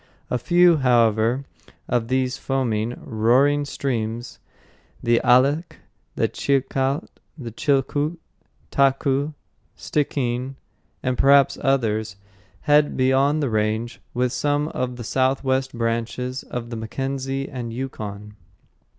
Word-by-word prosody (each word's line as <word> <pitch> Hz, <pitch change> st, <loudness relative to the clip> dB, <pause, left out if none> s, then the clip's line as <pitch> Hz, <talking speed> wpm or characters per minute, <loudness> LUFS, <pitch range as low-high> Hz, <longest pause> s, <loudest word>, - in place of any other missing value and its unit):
A 125 Hz, -, +1 dB
few, 175 Hz, +4 st, +5 dB
however, 120 Hz, 0 st, +2 dB, 0.4 s
of 120 Hz, -2 st, 0 dB
these 130 Hz, 0 st, 0 dB
foaming, 125 Hz, -4 st, -2 dB
roaring 130 Hz, +6 st, +3 dB
streams—the 120 Hz, -2 st, -4 dB
Alsek, 135 Hz, +7 st, +3 dB, 0.4 s
Chilcat, 135 Hz, +1 st, 0 dB, 0.3 s
Chilcoot, 140 Hz, +5 st, -1 dB, 0.5 s
Taku, 140 Hz, +1 st, +2 dB, 0.4 s
Stickeen, 130 Hz, -3 st, -2 dB, 0.5 s
and 130 Hz, -1 st, -1 dB
perhaps 140 Hz, 0 st, +5 dB
others—head 105 Hz, -, 0 dB
beyond 135 Hz, +3 st, +2 dB
the 135 Hz, -, 0 dB
range 110 Hz, +2 st, -1 dB
with 125 Hz, 0 st, 0 dB
some 145 Hz, +1 st, 0 dB
of 125 Hz, -4 st, -3 dB
the 120 Hz, -, -7 dB
southwest 130 Hz, +2 st, 0 dB
branches 115 Hz, +3 st, -2 dB
of 120 Hz, -1 st, -6 dB
the -, -, -4 dB
Mackenzie 135 Hz, +4 st, -3 dB
and 120 Hz, -4 st, -6 dB
Yukon. 105 Hz, -5 st, -6 dB
130 Hz, 95 wpm, -23 LUFS, 115-140 Hz, 0.5 s, few